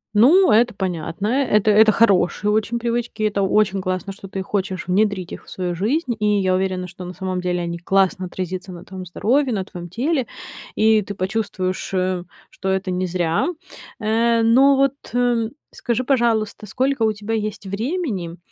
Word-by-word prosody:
Ну, 330 - +6
это 235 +2 +4
понятно. 180 +1 -3
Э, 270 +4 +2
это 215 +1 +3
это 215 +1 +6
хорошие 205 -1 +3
очень 220 +2 0
привычки. 235 -2 -2
Это 205 -2 +1
очень 195 0 +2
классно, 185 +1 -3
что 195 0 -11
ты 190 0 -4
хочешь 190 -2 -3
внедрить 190 -1 +1
их - - -8
в - - -16
свою 180 -2 -3
жизнь, 240 - 0
и 210 - 0
я 185 -1 +1
уверена, 185 -1 -1
что 180 0 -10
на 180 - -7
самом 185 0 -3
деле 180 -1 -1
они 170 0 -4
классно 190 0 +1
отразится 185 +1 -5
на 175 - -9
твоём 185 -1 -8
здоровье, 250 +8 +1
на 195 -2 -1
твоём 175 -2 -9
теле, 260 - -1 0.5
и 220 0 +4
ты 200 0 -7
почувствуешь, 190 -2 -2
э, 185 -1 0 0.3
что 190 - -4
это 190 0 -1
не 180 0 -1
зря. 170 - 0 0.5
Э, 230 +1 +2
но 265 +5 +5
вот, 275 0 +3 0.2
м, 240 -2 +2 0.2
скажи, 245 +1 -2
пожалуйста, 230 -5 0
сколько 260 +3 -1
у 215 -1 +3
тебя 210 +2 -5
есть 215 -2 -3
времени 200 - -3
205 Hz, 180 wpm, -21 LUFS, 185-230 Hz, 0.5 s, Ну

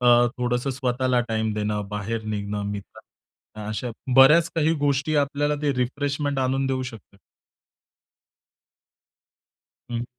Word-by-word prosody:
अ, 120 0 +6
थोडंसं 125 +2 0
स्वतःला 125 -1 0
टाईम 110 -1 0
देणं, 105 -1 -2
बाहेर 105 +2 -3
निघणं, 105 -1 -3
मित्रांना 100 -1 -9 0.5
भेटणं, 105 -1 -7
अशा 115 +3 -3 0.3
बऱ्याच 155 +5 +7
काही 160 0 +2
गोष्टी 145 +2 +1
आपल्याला 145 +1 +1
ते 145 -1 +2
रिफ्रेशमेंट 140 +3 -1
आणून 135 +1 +1
देऊ 130 -1 -1
शकतात? 115 -6 -10 2.7
हं. 120 0 -2
125 Hz, 120 wpm, -24 LUFS, 110-140 Hz, 2.7 s, बऱ्याच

